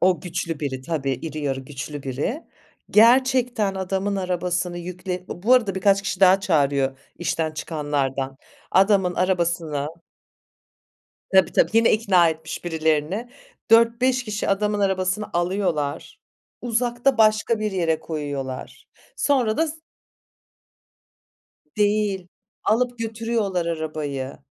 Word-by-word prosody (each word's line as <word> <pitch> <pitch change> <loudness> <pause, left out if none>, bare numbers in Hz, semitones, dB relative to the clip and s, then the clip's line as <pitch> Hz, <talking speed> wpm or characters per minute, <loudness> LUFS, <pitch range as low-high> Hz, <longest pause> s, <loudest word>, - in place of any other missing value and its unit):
O 180 -3 +3
güçlü 170 -2 -4
biri, 135 -3 -3
tabii, 140 -1 -2
iri 155 +4 -5
yarı 135 -2 -2
güçlü 145 +1 -7
biri. 140 - -3 0.5
Gerçekten 240 -2 +4
adamın 190 +1 -2
arabasını 180 -1 -2
yükleni 180 +1 -5
bu 220 +8 +2
arada 220 -7 +2
birkaç 195 +1 +3
kişi 195 -1 -3
daha 190 0 +6
çağırıyor 140 -6 +1 0.2
işten 165 -2 -1
çıkanlardan. 140 -4 -2 0.3
Adamın 190 -2 +3
arabasını 170 -5 0 1.5
Tabii 190 -2 +5
tabii, - - +3
yine 225 +1 +4
ikna 190 -6 +4
etmiş 160 +1 -5
birilerini, 160 +6 0 0.4
4-5 240 +2 +4
kişi 210 -1 -3
adamın 210 +1 +1
arabasını 190 +1 0
alıyorlar, 175 -5 -2 0.4
uzakta 240 +2 0
başka 215 +1 +3
bir 215 -1 -1
yere 165 -4 0
koyuyorlar. 145 -5 -6 0.3
Sonra 255 - +1
da 320 - +2
s 315 +1 -8 2.0
Değil, 205 -3 +1 0.4
alıp 245 +3 +1
götürüyorlar 225 -5 -2
arabayı. 155 -5 -4
185 Hz, 110 wpm, -23 LUFS, 155-215 Hz, 2.0 s, daha